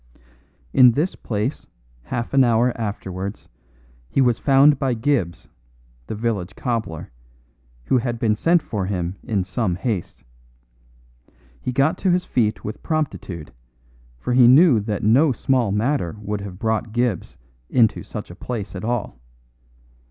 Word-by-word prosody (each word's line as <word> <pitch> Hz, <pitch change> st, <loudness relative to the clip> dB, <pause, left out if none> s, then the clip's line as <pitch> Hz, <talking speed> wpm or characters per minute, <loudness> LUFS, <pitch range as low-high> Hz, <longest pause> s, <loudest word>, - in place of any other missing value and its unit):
In 125 Hz, -3 st, +7 dB
this 155 Hz, +9 st, 0 dB
place 110 Hz, +6 st, -3 dB, 0.3 s
half 120 Hz, -, -4 dB
an 135 Hz, -1 st, +6 dB
hour 120 Hz, 0 st, +2 dB
afterwards 100 Hz, -3 st, -5 dB, 0.6 s
he -, -, 0 dB
was 125 Hz, -3 st, +3 dB
found 140 Hz, +1 st, +5 dB
by 130 Hz, -3 st, 0 dB
Gibbs, 110 Hz, -, -1 dB, 0.6 s
the -, -, -4 dB
village 105 Hz, -4 st, -2 dB
cobbler, 110 Hz, -, -3 dB, 0.7 s
who 130 Hz, -, +3 dB
had 120 Hz, -1 st, -2 dB
been 115 Hz, -2 st, +1 dB
sent 165 Hz, +8 st, +2 dB
for 100 Hz, -4 st, -3 dB
him 90 Hz, -1 st, -3 dB
in 105 Hz, -6 st, -1 dB
some 95 Hz, 0 st, -1 dB
haste. 95 Hz, -1 st, -4 dB, 1.4 s
He 125 Hz, -, -2 dB
got 135 Hz, +5 st, +1 dB
to 190 Hz, -, +1 dB
his 180 Hz, 0 st, +2 dB
feet 110 Hz, -4 st, 0 dB
with 105 Hz, -, -6 dB
promptitude, 135 Hz, -, -3 dB, 0.6 s
for 125 Hz, -, -3 dB
he 125 Hz, -1 st, +7 dB
knew 135 Hz, -1 st, +7 dB
that 105 Hz, 0 st, -3 dB
no 130 Hz, +8 st, +4 dB
small 125 Hz, -3 st, +1 dB
matter 105 Hz, -, 0 dB
would 105 Hz, -1 st, -4 dB
have 100 Hz, -2 st, -8 dB
brought 110 Hz, 0 st, -1 dB
Gibbs 120 Hz, -, -1 dB, 0.3 s
into 115 Hz, -4 st, +3 dB
such -, -, -8 dB
a -, -, -10 dB
place 115 Hz, -5 st, -5 dB
at -, -, -6 dB
all. 115 Hz, -, -3 dB
115 Hz, 145 wpm, -22 LUFS, 100-130 Hz, 1.4 s, In